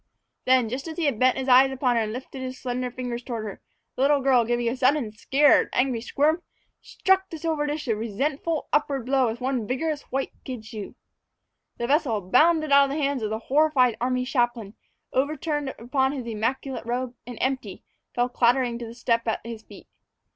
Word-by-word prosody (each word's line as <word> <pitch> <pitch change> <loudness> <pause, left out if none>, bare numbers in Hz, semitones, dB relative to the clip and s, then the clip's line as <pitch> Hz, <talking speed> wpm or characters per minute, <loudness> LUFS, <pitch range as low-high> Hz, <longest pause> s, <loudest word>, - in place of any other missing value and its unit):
Then, 255 -2 +4
just 255 +7 -5
as 320 - -7
he 310 -4 +2
bent 255 +2 +2
his 265 0 -3
eyes 260 +1 +7
upon 255 -2 +1
her 230 - +2
and 215 -1 -2
lifted 260 +3 -7
his 260 0 -5
slender 250 0 -3
fingers 245 -1 -5
toward 235 -3 -5
her 215 - -4
head, - - -13 0.4
the - - -3
little 285 +1 +4
girl, 260 -3 +4
giving 240 0 0
a 235 - 0
sudden 260 -3 +2
scared, 275 +7 +3
angry 250 -3 +1
squirm, 305 +7 +1 0.4
struck 380 0 +1
the 325 - -6
silver 310 -2 -1
dish 295 -1 -3
a 225 - +1
resentful, 275 +9 -2
upward 280 -4 +1
blow 265 -1 +2
with 225 +1 -3
one 250 -4 -2
vigorous, 295 +4 -2
white 270 +1 -1
kid 250 -4 -7
shoe. 215 -2 -8 0.8
The 235 - -2
vessel 270 -5 +1
bounded 310 - +3
out 280 0 +7
of - - -4
the 285 +3 -2
hands 275 -2 0
of 215 - -2
the 220 - -2
horrified 265 -1 +3
army 255 0 0
chaplain, 240 -5 -1 0.4
overturned 295 +1 -1
upon 265 +3 0
his 260 -4 -5
immaculate 235 +3 -3
robe, 245 +1 -2
and, 245 -2 -7
empty, 255 -7 -2 0.3
fell 245 0 +2
clattering 245 0 +2
to 235 - -6
the 230 - -10
step 230 -1 0
at 225 - -2
his 230 -2 -7
feet. - - -14
255 Hz, 195 wpm, -25 LUFS, 235-280 Hz, 0.8 s, eyes